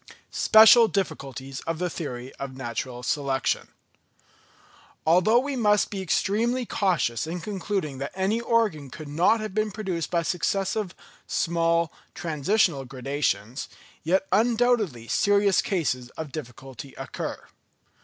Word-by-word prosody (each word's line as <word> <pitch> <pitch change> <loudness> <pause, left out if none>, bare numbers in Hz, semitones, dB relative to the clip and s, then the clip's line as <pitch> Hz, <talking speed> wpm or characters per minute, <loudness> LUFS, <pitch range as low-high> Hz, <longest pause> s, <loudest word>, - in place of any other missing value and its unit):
Special 220 +1 +7
Diffculties 135 -8 -4
of 165 0 -1
the 180 +2 -1
Theory 130 -7 -6
of 135 -1 -6
Natural 125 0 -5
Selection. 135 -1 0 1.4
Although 180 +8 +5
we 275 +2 0
must 210 -4 +2
be 195 -2 -3
extremely 225 +8 0
cautious 160 - 0
in 175 +2 -4
concluding 190 -6 -3
that 140 - -3
any 195 +5 0
organ 220 - +1
could 155 +3 -9
not 175 +10 +2
have 215 -3 -5
been 215 +1 0
produced 190 -6 -3
by 170 -1 +1
successive, 195 +2 -1 0.3
small, 170 -1 +1 0.2
transitional 165 -1 +1
gradations, 130 -2 -2 0.3
yet 190 +4 +1
undoubtedly 220 - +2
serious 200 - +3
cases 130 -10 -1
of 160 -3 -5
difficulty 135 -1 -9
occur. - - -5
170 Hz, 120 wpm, -26 LUFS, 135-210 Hz, 1.4 s, Special